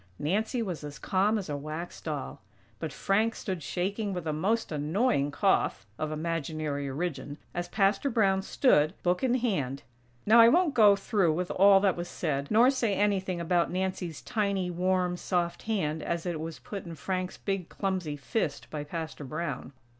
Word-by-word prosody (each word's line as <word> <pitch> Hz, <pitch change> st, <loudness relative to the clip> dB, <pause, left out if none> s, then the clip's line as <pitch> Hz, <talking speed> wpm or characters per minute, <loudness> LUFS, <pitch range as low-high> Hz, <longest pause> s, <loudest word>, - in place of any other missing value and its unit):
Nancy 215 Hz, -, 0 dB
was 180 Hz, -7 st, -5 dB
as 145 Hz, -1 st, -7 dB
calm 195 Hz, +7 st, +1 dB
as 195 Hz, -, -4 dB
a 145 Hz, -, -3 dB
wax 155 Hz, +4 st, -6 dB
doll; 150 Hz, -9 st, -5 dB, 0.4 s
but 160 Hz, -3 st, -4 dB
Frank 215 Hz, +9 st, +1 dB
stood 185 Hz, -4 st, -4 dB
shaking 195 Hz, +6 st, -2 dB
with 180 Hz, -2 st, -4 dB
a 155 Hz, -, -1 dB
most 200 Hz, +9 st, 0 dB
annoying 155 Hz, -, +1 dB
cough 145 Hz, -, +1 dB
(of 155 Hz, 0 st, -2 dB
imaginary 155 Hz, -3 st, -2 dB
origin!) 145 Hz, -1 st, -4 dB, 0.2 s
as 175 Hz, 0 st, -3 dB
Pastor 195 Hz, +7 st, +2 dB
Brown 195 Hz, -5 st, +2 dB
stood, 185 Hz, -, +3 dB
book 180 Hz, 0 st, +1 dB
in 250 Hz, -1 st, +3 dB
hand. 165 Hz, -, -1 dB, 0.4 s
Now 225 Hz, +3 st, +7 dB
I 230 Hz, 0 st, +9 dB
won't 335 Hz, +1 st, +3 dB
go 210 Hz, -3 st, +7 dB
through 195 Hz, -4 st, +1 dB
with 180 Hz, +2 st, -2 dB
all 195 Hz, +1 st, +6 dB
that 195 Hz, -2 st, +3 dB
was 175 Hz, 0 st, -4 dB
said; 140 Hz, -4 st, -2 dB
nor 235 Hz, +5 st, +6 dB
say 235 Hz, -7 st, 0 dB
anything 190 Hz, -3 st, 0 dB
about 170 Hz, 0 st, +1 dB
Nancy's 180 Hz, -4 st, -3 dB
tiny, 200 Hz, -5 st, -1 dB
warm, 180 Hz, 0 st, 0 dB
soft 175 Hz, -1 st, -1 dB
hand 160 Hz, -8 st, 0 dB
as 170 Hz, +2 st, -2 dB
it 170 Hz, -3 st, -2 dB
was 160 Hz, 0 st, -5 dB
put 200 Hz, -3 st, -7 dB
in 170 Hz, -2 st, -8 dB
Frank's 185 Hz, +3 st, -3 dB
big 195 Hz, -3 st, -3 dB
clumsy 185 Hz, -7 st, -2 dB
fist 150 Hz, -, -3 dB
by 150 Hz, -1 st, -4 dB
Pastor 160 Hz, 0 st, -6 dB
Brown. 145 Hz, -1 st, -4 dB
180 Hz, 175 wpm, -29 LUFS, 155-200 Hz, 0.4 s, I